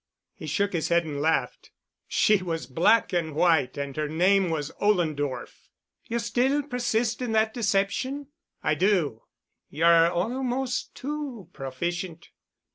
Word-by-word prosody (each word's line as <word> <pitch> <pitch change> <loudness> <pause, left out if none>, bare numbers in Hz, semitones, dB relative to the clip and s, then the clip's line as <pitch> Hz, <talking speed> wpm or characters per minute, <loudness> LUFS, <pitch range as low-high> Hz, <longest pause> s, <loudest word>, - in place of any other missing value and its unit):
He - - -9
shook 200 -2 0
his 165 -3 0
head 170 0 +3
and 145 -2 -4
laughed. 160 +2 0 0.4
"She 210 -3 +3
was 165 -3 -3
black 185 - +3
and 160 -4 -1
white 160 -6 +2
and 140 -1 -4
her 150 -1 -1
name 185 +4 +3
was 150 -2 -2
Ollendorff." 155 -9 -1 0.4
"You'll 235 0 -2
still 250 +5 +1
persist 240 -3 -1
in 240 -3 -2
that 220 0 +2
deception?" 235 +6 -1 0.3
"I - - +2
do." 175 - +1 0.4
"You're 165 +2 +5
almost 245 +8 -2
too 270 - -5
proficient." 170 +5 -5
185 Hz, 130 wpm, -26 LUFS, 160-230 Hz, 0.4 s, You're